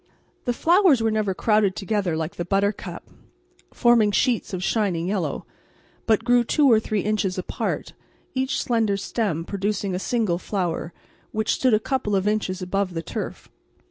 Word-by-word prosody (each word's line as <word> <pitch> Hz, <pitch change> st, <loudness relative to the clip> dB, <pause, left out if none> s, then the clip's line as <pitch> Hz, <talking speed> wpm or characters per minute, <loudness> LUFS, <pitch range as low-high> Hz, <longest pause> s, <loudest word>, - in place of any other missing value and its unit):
The 245 Hz, -, +1 dB
flowers 340 Hz, -, +4 dB
were 225 Hz, -, +2 dB
never 210 Hz, -3 st, 0 dB
crowded 210 Hz, -3 st, +2 dB
together 190 Hz, -2 st, -1 dB
like 160 Hz, +1 st, -3 dB
the 175 Hz, -, -2 dB
buttercup, 200 Hz, +3 st, -2 dB, 0.6 s
forming 240 Hz, -4 st, +4 dB
sheets 235 Hz, +3 st, +1 dB
of 185 Hz, -2 st, -4 dB
shining 190 Hz, -6 st, 0 dB
yellow, 185 Hz, -7 st, -2 dB, 0.6 s
but 220 Hz, -2 st, +3 dB
grew 245 Hz, 0 st, +4 dB
two 280 Hz, +3 st, +3 dB
or 220 Hz, -, +6 dB
three 215 Hz, -2 st, -1 dB
inches 205 Hz, -2 st, -1 dB
apart, 185 Hz, -, -3 dB, 0.4 s
each 265 Hz, +1 st, -1 dB
slender 225 Hz, -4 st, +1 dB
stem 195 Hz, -4 st, -2 dB
producing 200 Hz, 0 st, -2 dB
a 180 Hz, -, -1 dB
single 210 Hz, -5 st, 0 dB
flower, 175 Hz, -4 st, -2 dB, 0.4 s
which 220 Hz, 0 st, 0 dB
stood 255 Hz, -4 st, +3 dB
a -, -, +2 dB
couple 220 Hz, -3 st, -1 dB
of 195 Hz, +1 st, +1 dB
inches 200 Hz, -3 st, -1 dB
above 185 Hz, 0 st, -1 dB
the 165 Hz, -, -3 dB
turf. -, -, -6 dB
205 Hz, 160 wpm, -24 LUFS, 185-225 Hz, 0.6 s, or